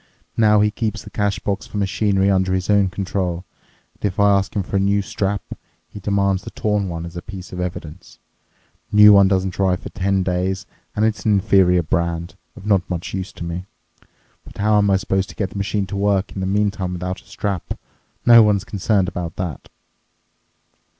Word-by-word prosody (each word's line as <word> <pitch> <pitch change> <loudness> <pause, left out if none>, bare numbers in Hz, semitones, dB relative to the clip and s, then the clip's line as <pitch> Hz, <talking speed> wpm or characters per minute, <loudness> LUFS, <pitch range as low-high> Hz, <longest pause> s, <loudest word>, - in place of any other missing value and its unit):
Now 105 -2 +4
he 105 0 +3
keeps 110 -1 -3
the - - -12
cash 100 -2 0
box 100 0 -3
for - - -6
machinery 100 0 +1
under 95 -1 +2
his 95 +2 -1
own 100 -2 +4
control, 90 -1 -3 0.5
and - - -28
if 100 -2 -1
I 100 0 +5
ask 100 0 -1
him 100 - 0
for 100 - -2
a - - +2
new 100 +1 +2
strap, 100 0 -2 0.4
he 105 - -10
demands 100 -1 +1
the - - -8
torn 105 -3 -1
one 85 -1 -5
as 85 0 -9
a 85 - -5
piece 95 -2 -9
of 90 - -5
evidence, 90 -1 -6 0.7
the - - -5
new 105 0 +10
one 100 -1 +7
doesn't 95 -1 0
arrive 95 -2 +2
for - - -7
ten 95 0 0
days, 95 +2 -1 0.3
and 105 - +2
it's 105 -3 -1
an 110 - +3
inferior 95 -2 +4
brand, 85 +1 -1 0.2
of - - -12
not 100 -3 +3
much 90 -2 -4
use 95 0 -4
to - - -8
me. 85 +2 -5 0.8
But - - -14
how 105 +1 +2
I - - +5
am 100 -1 +3
supposed 95 0 -1
to - - -11
get 95 -3 -2
the - - -7
machine 100 0 -1
to 100 +1 -6
work 100 0 +1
in 95 - -5
the 95 - -1
meantime 100 -2 0
without 90 +1 -4
a - - -28
strap—no 105 +4 +1
one's 105 -3 +3
concerned 100 -1 0
about 90 -3 -5
that." 90 -7 -5
95 Hz, 205 wpm, -20 LUFS, 90-100 Hz, 0.8 s, new